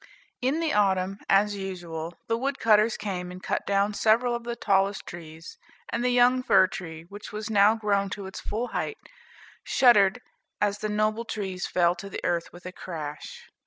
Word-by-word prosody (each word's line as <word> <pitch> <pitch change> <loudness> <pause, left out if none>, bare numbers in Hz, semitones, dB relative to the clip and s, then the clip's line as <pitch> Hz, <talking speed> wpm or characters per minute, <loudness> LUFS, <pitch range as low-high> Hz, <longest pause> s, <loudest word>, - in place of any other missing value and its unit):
In 275 +6 +1
the 320 -2 0
autumn, 195 -1 +1
as 205 +1 +4
usual, 175 -4 -6
the 230 - +1
wood 270 +4 -2
cutters 215 0 +4
came 180 -3 -4
and 180 +1 -10
cut - - -2
down 200 +1 +2
several 230 +4 +3
of 235 0 -4
the 235 0 -3
tallest 195 -2 +1
trees, 165 -1 -10 0.3
and 235 - -2
the 250 - +2
young 245 +1 +4
fir 190 -6 +5
tree, 165 -3 -7
which 200 +5 -10
was 215 +1 -5
now 205 +1 +5
grown 200 -3 0
to 200 - -7
its 190 - -7
full 235 +4 -3
height, 440 - -3 0.7
shuddered 225 -5 +4 0.4
as 205 0 0
the 215 - -2
noble 215 +2 0
trees 190 -5 -4
fell 175 -1 +3
to 200 +2 -9
the - - -6
earth 170 -1 -1
with 175 +1 -14
a 180 - -5
crash. 155 -5 -7
200 Hz, 185 wpm, -26 LUFS, 185-225 Hz, 0.7 s, fir